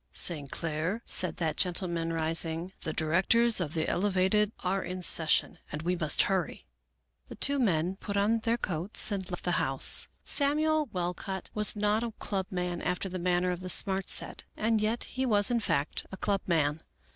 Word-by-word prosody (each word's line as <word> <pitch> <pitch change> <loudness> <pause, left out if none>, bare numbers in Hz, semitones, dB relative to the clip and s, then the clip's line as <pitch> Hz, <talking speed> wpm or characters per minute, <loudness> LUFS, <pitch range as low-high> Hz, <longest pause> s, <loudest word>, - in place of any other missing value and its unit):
" 65 - -46 0.2
St. 145 -5 -6
Clair," 165 - -3
said 180 - 0
that 160 -3 -2
gentleman, 170 -2 0
rising, 165 +2 -1
" - - -37
the 160 - -3
directors 195 +10 +3
of 160 -3 -3
the 160 - 0
Elevated 200 +2 +2
are 190 +1 0
in 185 0 -5
ses 160 -2 0
sion, - - +2
and 150 +1 -5
we 180 +2 0
must 155 -4 +3
hurry." 190 -2 -2 0.6
The - - -8
two 280 0 +3
men 185 -5 +1
put 200 0 -4
on 215 +3 +2
their 230 +1 0
coats 185 +1 -2
and 190 -3 -3
left 175 - -5
the 180 - 0
house. 135 -3 +2 0.2
Samuel 305 +1 +2
Walcott 180 +1 -4
was 210 0 +2
not 210 +1 +1
a 230 -2 -4
club 190 -3 -3
man 180 -2 -3
after 180 +2 -2
the 185 0 -5
manner 180 +1 +1
of 175 - -4
the 185 0 -5
Smart 190 0 +3
Set, - - 0
and 220 0 +1
yet 220 +3 0
he 260 - -4
was 210 -3 +2
in 240 - +2
fact 145 -9 -2
a 190 - -7
club 200 +1 0
man. 155 -3 +1
185 Hz, 190 wpm, -29 LUFS, 165-210 Hz, 0.6 s, directors